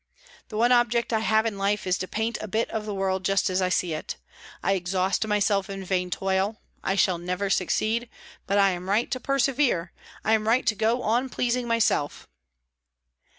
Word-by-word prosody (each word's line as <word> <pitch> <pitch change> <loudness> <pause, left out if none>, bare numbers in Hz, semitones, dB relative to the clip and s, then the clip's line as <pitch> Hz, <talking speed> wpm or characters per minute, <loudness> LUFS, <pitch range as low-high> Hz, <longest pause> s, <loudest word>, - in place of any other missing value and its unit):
The 215 - -6
one 240 +2 +3
object 240 -1 +2
I 220 - +3
have 220 0 +2
in 210 -3 -2
life 200 +1 0
is 185 -1 0
to 185 - -3
paint 220 +4 -2
a 215 - -5
bit 220 +4 -1
of 215 -1 -3
the 210 - -3
world 190 -1 -1
just 195 0 +1
as 185 +1 +1
I 185 - +1
see 180 -2 0
it. 155 - -5 0.5
I - - +2
exhaust 190 +3 0
myself 205 -2 +1
in 195 -1 -5
vain 180 -1 -1
toil; 190 +3 -1 0.2
I 195 - 0
shall 185 -3 +2
never 180 +3 -2
succeed; 220 +6 0 0.4
but 200 - +1
I 195 -1 +5
am 180 +1 -5
right 215 +4 +1
to 255 - -1
persevere, 265 -10 +1 0.3
I 220 - +3
am 215 -1 +1
right 240 +4 +3
to 220 - +3
go 225 +4 0
on 240 +4 +1
pleasing 245 0 -1
myself." 230 -10 0
205 Hz, 195 wpm, -26 LUFS, 190-230 Hz, 0.5 s, I